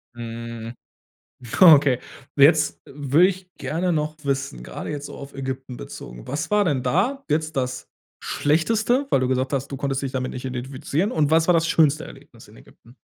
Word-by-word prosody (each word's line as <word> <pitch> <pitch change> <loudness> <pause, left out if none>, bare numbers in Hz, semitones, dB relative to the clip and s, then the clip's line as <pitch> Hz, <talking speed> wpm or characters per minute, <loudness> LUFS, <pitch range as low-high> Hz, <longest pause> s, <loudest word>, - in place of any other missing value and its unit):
Mhm. 115 0 -7 0.9
Okay. 145 -7 +7 0.4
Jetzt 150 +2 +4
würde 145 +5 +3
ich 185 -1 -6
gerne 175 +3 -1
noch 155 -1 -1
wissen, 135 - -2
grade - - -7
jetzt 145 -1 -5
so - - -9
auf 140 0 -10
Ägypten 130 -1 -5
bezogen: - - -9
Was 150 +4 -3
war 210 0 +4
denn 140 -7 0
da 200 - 0
jetzt 155 0 -1
das 125 -1 -3 0.3
Schlechteste? 225 - +1
Weil - - +3
du 130 - 0
gesagt 130 +1 0
hast, 135 0 -1
du 135 - -5
konntest 135 0 -2
dich 135 -2 -3
damit 130 -1 -3
nicht 125 - -7
identifizieren. 130 - -2
Und 150 - +1
was 160 0 +4
war 180 - +5
das 165 -1 +2
schönste 155 -1 +3
Erlebnis - - -14
in - - -17
Ägypten? 115 - -19
140 Hz, 180 wpm, -23 LUFS, 130-160 Hz, 0.9 s, Okay